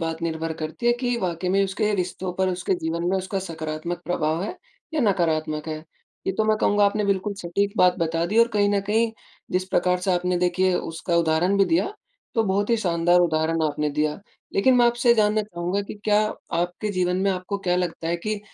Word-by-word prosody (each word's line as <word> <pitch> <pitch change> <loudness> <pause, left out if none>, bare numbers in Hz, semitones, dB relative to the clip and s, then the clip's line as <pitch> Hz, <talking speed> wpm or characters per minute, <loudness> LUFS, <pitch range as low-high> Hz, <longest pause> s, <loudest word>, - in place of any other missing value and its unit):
बात 165 0 -3
निर्भर 165 -1 -2
करती 155 +9 -4
है, 240 - +6
कि 245 0 -1
वाक़ई 180 0 -2
में 195 +1 +3
उसके 210 +2 -1
रिश्तों 180 -1 -3
पर, 190 +1 0
उसके 185 +1 -1
जीवन 170 0 -3
में, 190 - +2
उसका 190 +1 -2
सकारात्मक 160 +1 -5
प्रभाव 160 -1 -1
है 215 - -4 0.4
या 310 - +1
नकारात्मक 160 - 0
है। 155 - -3 0.5
ये 190 - +1
तो 215 +3 0
मैं 215 0 +3
कहूँगा 205 -1 +3
आपने 210 +1 +1
बिल्कुल 200 +1 0
सटीक 200 +4 -1
बात 180 -3 +4
बता 165 0 0
दी 215 +5 0
और 230 0 +6
कहीं 205 -3 +2
न 200 - +2
कहीं, 220 +3 +1 0.4
जिस 185 0 +1
प्रकार 180 -1 +2
से 185 +1 +1
आपने 180 0 0
देखिए, 180 +1 +2
उसका 170 0 -2
उदाहरण 170 +4 +2
भी 195 - +6
दिया, 330 - +1 0.4
तो 225 - +3
बहुत 200 +2 0
ही 230 - +4
शानदार 175 -3 +2
उदाहरण 160 -1 +1
आपने 150 -1 0
दिया, 150 +3 0 0.3
लेकिन 255 +6 +4
मैं 240 -1 +5
आपसे 240 +1 +1
ये 235 - +8
जानना 215 -1 +2
चाहूँगा 180 -1 -3
कि - - -5
क्या 210 0 +4 0.4
आपके 175 +4 -2
जीवन 180 -1 0
में 195 +1 +1
आपको 185 +2 -3
क्या 180 0 +3
लगता 175 -2 -2
है 170 - +1
कि 210 +4 -3
180 Hz, 215 wpm, -24 LUFS, 170-205 Hz, 0.5 s, ये